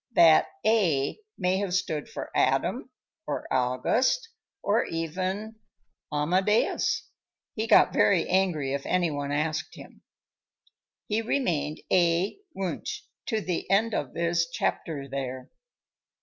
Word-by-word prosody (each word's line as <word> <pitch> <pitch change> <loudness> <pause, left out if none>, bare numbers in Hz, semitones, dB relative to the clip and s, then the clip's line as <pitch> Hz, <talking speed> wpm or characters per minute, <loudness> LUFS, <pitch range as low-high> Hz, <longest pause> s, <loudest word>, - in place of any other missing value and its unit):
That - - +6 0.2
"A" 175 - +2 0.2
may 185 0 +1
have 190 -2 -1
stood 155 -5 -2
for - - -7
Adam, - - +1 0.4
or - - -3
August, 130 - +1 0.3
or 210 +3 +2
even 185 +7 -3 0.5
Amadeus; 185 +9 +1 0.5
he 220 +1 -2
got - - +6
very 185 -5 +3
angry 175 -8 +1
if 140 0 -2
any 175 -3 +1
one 145 -1 -3
asked 155 +1 -1
him. - - -13 1.0
He 215 +1 0
remained 175 - -1
A. 175 - +2 0.2
Wunsch 190 -3 -4 0.3
to 220 -3 0
the 180 -3 -3
end 215 +4 +3
of 140 -9 -3
his 170 0 +1
chapter 145 -5 -2
there. 130 -1 -5
175 Hz, 120 wpm, -27 LUFS, 150-200 Hz, 1.0 s, That